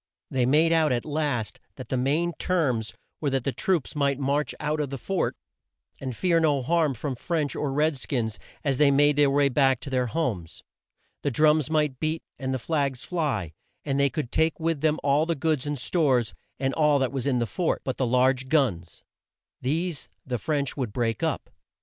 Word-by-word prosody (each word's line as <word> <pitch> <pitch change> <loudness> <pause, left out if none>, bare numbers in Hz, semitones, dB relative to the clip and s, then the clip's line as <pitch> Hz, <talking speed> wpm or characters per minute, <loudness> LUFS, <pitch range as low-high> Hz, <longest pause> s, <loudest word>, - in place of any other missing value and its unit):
They 125 -2 +1
made 160 +5 +4
out 160 -3 +3
at 120 -1 0
last 145 -8 -2 0.2
that 130 - -9
the - - 0
main 150 +7 +1
terms 130 -12 0 0.2
were 145 - 0
that 135 -2 0
the 135 - 0
troops 170 0 -1
might 140 -2 +1
march 140 +2 0
out 155 +1 -1
of 145 -2 -1
the 135 - -4
fort, 190 +9 -1 0.6
and 130 -3 -5
fear 175 -3 +3
no 145 -5 +2
harm 160 -1 +2
from 135 +4 -3
French 150 +3 -2
or 145 - -1
red 150 +1 +1
skins 115 -4 -2 0.2
as 135 -3 0
they 150 -2 +6
made 145 +1 +4
their 145 -1 +5
way 140 0 +3
back 135 -1 +3
to 140 - -7
their 125 -1 +1
homes. 110 - -3 0.6
The - - 0
drums 150 +1 +3
might 150 -4 +1
beat 160 +1 -1 0.2
and 130 -1 -2
the 130 - 0
flags 140 -2 -1
fly, 140 - -2 0.3
and 140 -1 0
they 140 0 +4
could 135 -4 -4
take 160 +1 +1
with 165 -3 -1
them 155 0 +2
all 145 +3 +3
the 170 - 0
goods 150 -1 0
and 145 0 -2
stores, 130 -4 +1 0.3
and 135 0 0
all 150 -2 +3
that 130 -2 0
was 135 -1 -3
in 130 -3 +2
the 120 - +1
fort 170 - -1
but 130 - -3
the 130 - +1
large 130 +2 +2
guns. 105 - 0 0.6
These 160 +4 -2 0.2
the 125 -3 -2
French 140 +2 -1
would 125 -6 -3
break 115 -2 -1
up. - - -2
140 Hz, 200 wpm, -26 LUFS, 130-155 Hz, 0.6 s, they